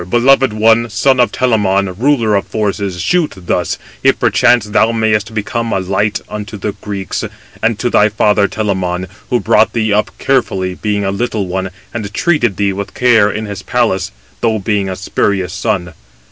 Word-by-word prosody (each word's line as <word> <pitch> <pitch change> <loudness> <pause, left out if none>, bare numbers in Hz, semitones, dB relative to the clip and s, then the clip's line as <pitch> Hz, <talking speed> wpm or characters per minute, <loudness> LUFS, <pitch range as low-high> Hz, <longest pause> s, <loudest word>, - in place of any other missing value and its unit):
"Teucer, 85 - -9
beloved 130 +3 +4
one, 115 +2 +3
son 130 +5 +2
of 120 - +3
Telamon, 100 -6 +1
ruler 120 -1 +2
of 100 - 0
forces, 100 -3 -2
shoot 175 - +1
thus, 90 -1 -2 0.2
if - - +3
perchance 120 -2 +3
thou 110 +2 +2
mayest 110 -1 0
become 115 +2 -2
a - - +1
light 100 +3 0
280 105 -1 -5
to 105 - -7
the 105 +2 -3
Greeks, 100 -1 -4 0.4
and 110 -1 +1
to 120 - -1
thy 105 -3 +4
father 105 -1 +2
Telamon, 95 -4 -2 0.2
who 120 - +2
brought 110 -1 +3
thee 110 -3 0
up 105 +1 +1
carefully, 100 -9 0
being 105 +1 -2
a 95 - 0
little 105 0 -2
one, 95 +1 -3 0.2
and 105 -4 -4
treated 120 - +1
thee 100 -1 +1
with 100 +1 -6
care 115 -4 +4
in 110 +2 -4
his 100 -2 -6
palace, - - 0 0.3
though 110 -2 +1
being 100 -1 -1
a 95 - -3
spurious 95 -1 -1
son. 95 -5 -2
105 Hz, 180 wpm, -15 LUFS, 100-115 Hz, 0.4 s, beloved